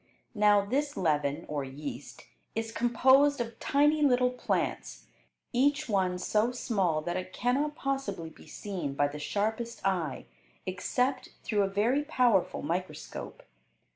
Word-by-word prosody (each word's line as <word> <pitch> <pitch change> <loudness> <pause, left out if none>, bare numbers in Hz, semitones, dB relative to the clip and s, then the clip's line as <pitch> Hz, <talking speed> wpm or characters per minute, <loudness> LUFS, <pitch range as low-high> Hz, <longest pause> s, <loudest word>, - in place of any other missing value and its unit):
Now, 205 -2 +4
this 285 +6 -1
leaven, 150 -2 0
or 145 -2 -2
yeast, 140 +2 -8 0.3
is 225 0 -2
composed 265 +5 +4
of 230 -1 -4
tiny 295 +2 +3
little 250 -3 +4
plants, 250 - -2 0.5
each 280 +4 +2
one 190 -4 +1
so 215 +6 +1
small 190 -10 0
that 175 +2 -2
it 185 0 -5
cannot 280 +5 0
possibly 270 - -3
be - - -16
seen 165 -5 -5
by 145 +1 +3
the 145 +1 -7
sharpest 220 +6 -2
eye 170 -9 -1 0.4
except 250 +8 -1
through 210 -3 +1
a 195 - +2
very 225 +9 +1
powerful 245 - +2
microscope. 165 0 -5
210 Hz, 135 wpm, -29 LUFS, 175-250 Hz, 0.5 s, Now